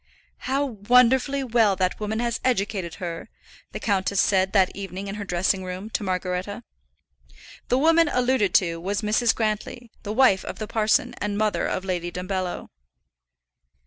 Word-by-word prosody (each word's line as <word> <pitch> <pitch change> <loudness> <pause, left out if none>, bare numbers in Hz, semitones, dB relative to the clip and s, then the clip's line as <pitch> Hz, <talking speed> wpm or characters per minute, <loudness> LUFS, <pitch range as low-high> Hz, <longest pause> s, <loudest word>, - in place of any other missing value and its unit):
"How 275 +2 +1
wonderfully 250 +4 +3
well 225 -5 +3
that 185 0 -1
woman 215 +1 -2
has 235 -1 -1
educated 200 -7 -1
her," 170 -2 -6 0.4
the - - -6
countess 200 -1 0
said 190 -2 +2
that 190 -3 +2
evening 195 0 -6
in 195 - -4
her 205 0 -5
dressing 185 0 0
room, 185 +4 -6
to - - -1
Margaretta. 185 +3 -3 1.0
The 250 - +2
woman 330 +2 +4
alluded 250 -5 +1
to 170 -3 +2
was 200 +4 -2
Mrs. 220 +3 +2
Grantly, 220 +2 -3
the 205 - -5
wife 220 -5 +4
of - - -7
the 215 - -4
parson 215 0 +1
and 205 0 -2
mother 215 0 0
of 185 - -3
Lady 175 -2 -2
Dumbello. 185 0 -4
205 Hz, 155 wpm, -24 LUFS, 185-235 Hz, 1.0 s, woman